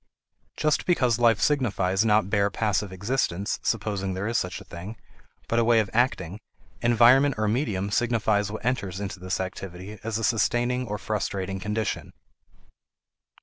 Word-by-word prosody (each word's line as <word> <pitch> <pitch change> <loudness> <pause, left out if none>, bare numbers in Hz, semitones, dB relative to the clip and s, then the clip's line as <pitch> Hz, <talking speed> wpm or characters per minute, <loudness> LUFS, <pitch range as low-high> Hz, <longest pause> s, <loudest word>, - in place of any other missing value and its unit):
Just 155 -1 +1
because 125 -10 +2
life 115 -3 +4
signifies 105 -9 +1
not 105 -3 +3
bare 100 0 +2
passive 105 -2 -1
existence 100 -1 -1
(supposing 95 -3 -1
there 95 +2 -3
is 115 - -2
such 90 -5 -1
a - - -11
thing), 95 +6 -9 0.5
but 115 - +1
a - - +4
way 115 0 +4
of 105 -3 -1
acting, 105 -6 0 0.4
environment 120 +4 +5
or 105 0 0
medium 105 -4 -1
signifies 110 -3 +1
what 110 - -7
enters 100 -7 -1
into 100 -2 -5
this 90 +1 -3
activity 95 +2 -6
as 110 -1 -2
a 115 - -4
sustaining 120 +3 +1
or 105 0 -3
frustrating 95 -3 -3
condition. 105 +1 -3
105 Hz, 150 wpm, -26 LUFS, 95-120 Hz, 0.5 s, environment